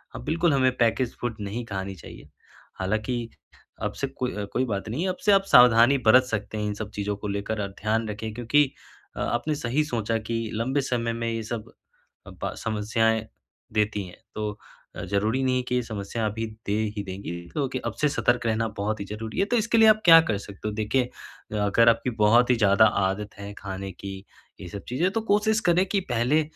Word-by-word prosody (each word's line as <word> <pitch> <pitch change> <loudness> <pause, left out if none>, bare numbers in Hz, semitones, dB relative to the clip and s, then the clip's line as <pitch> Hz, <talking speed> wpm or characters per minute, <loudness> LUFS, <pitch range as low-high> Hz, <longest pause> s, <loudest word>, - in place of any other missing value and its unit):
अ, - - -5
बिल्कुल 165 - +1
हमें 130 -2 +3
package 120 +1 +1
food 120 -2 -2
नहीं 105 +4 -4
खानी 95 -2 -5
चाहिए, 85 - -12 0.5
हालाँकि 110 +5 -2 0.5
अब - - -1
से - - +1
को 125 - -3 0.3
कोई 130 - +1
बात 100 -4 -3
नहीं 130 +10 -2
है, 190 - 0
अब 185 - -3
से 210 - +6
आप 195 0 +5
सावधानी 125 +2 +7
बरत 130 +3 +8
सकते 110 -3 -4
हैं 105 - -2
इन 105 - -1
सब 105 0 -5
चीज़ों 105 0 -2
को 105 - -6
लेकर। 100 +2 -3
अब 100 - -3
ध्यान 110 +2 0
रखें 110 +1 -5
क्योंकि 130 +5 +2 0.5
अ, - - -3
आपने 120 +6 -1
सही 140 +2 0
सोचा 115 -4 -1
कि 110 +1 -5 0.2
लंबे 130 +6 0
समय 120 -3 -1
में 115 0 -3
ये 115 0 -2
सब 110 0 -5 0.6
अब - - -7
समस्याएँ 110 +1 0 0.5
देती 105 -1 0
हैं, 90 - -12 0.2
तो 105 -1 -2 0.4
अ, - - -6
ज़रूरी 110 +6 0
नहीं 130 -1 +1
कि 125 - +1
ये 125 - +2
समस्या 110 0 -4
अभी 110 +2 -3 0.2
दे 100 - 0 0.2
ही 100 - -2
देंगी 95 -1 -6 0.2
क्योंकि 135 -3 -2
अब - - -2
से 150 - +4
सतर्क 120 -4 +1
रहना 115 0 +1
बहुत 105 +1 -1
ही 100 - -4
ज़रूरी 110 - -6
है। 195 - +3
तो 240 - +4
इसके 230 +1 +1
लिए 220 - +7
आप 215 0 +4
क्या 165 -1 +10
कर 105 - +1
सकते 100 +1 -8
हो, 105 - -5
देखिए 110 +4 +1 0.5
अ, - - -2
अगर 105 +3 +4
आपकी 115 +2 +1
बहुत 120 +4 +5
ही - - +5
ज़्यादा 105 0 +5 0.2
आदत 95 +2 -2
है 100 0 -7
खाने 95 0 -6
की, 95 +1 -7 0.5
ये - - -7
सब 100 +3 -7
चीजें, 160 +10 +1
तो 225 +1 -1
कोशिश 215 +1 +3
करें 180 +2 +4
कि 200 - +1
पहले 125 +7 +3
115 Hz, 210 wpm, -25 LUFS, 105-130 Hz, 0.6 s, क्या